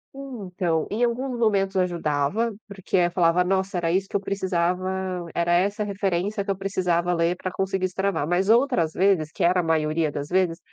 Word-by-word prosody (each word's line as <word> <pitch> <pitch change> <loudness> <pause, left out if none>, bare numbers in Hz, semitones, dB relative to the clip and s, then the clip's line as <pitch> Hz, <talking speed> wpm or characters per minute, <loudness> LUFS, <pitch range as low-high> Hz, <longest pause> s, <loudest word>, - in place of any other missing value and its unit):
Então, 190 - -3
em 225 +4 -1
alguns 245 +1 -1
momentos 200 -4 +1
ajudava, 175 +4 0 0.2
porque 195 -1 -3
aí 175 - +4
eu 175 - -1
falava: 175 0 +3
"Nossa, 190 0 0
era 165 -1 0
isso 190 +2 0
que - - -8
eu - - +3
precisava, 185 -1 -1
era 170 0 +1
essa 200 +4 +1
referência 200 0 -1
que 200 - -9
eu 195 - 0
precisava 180 -3 0
ler 170 +1 +1
para 185 - -4
conseguir 190 0 -1
destravar", 185 -4 -1
mas 185 +4 +1
outras 235 - +3
vezes, 180 -5 +2
que - - -3
era 180 +1 +4
a - - +1
maioria 155 -1 +1
das 145 0 -5
vezes, 180 -1 +1
185 Hz, 190 wpm, -24 LUFS, 170-200 Hz, 0.2 s, aí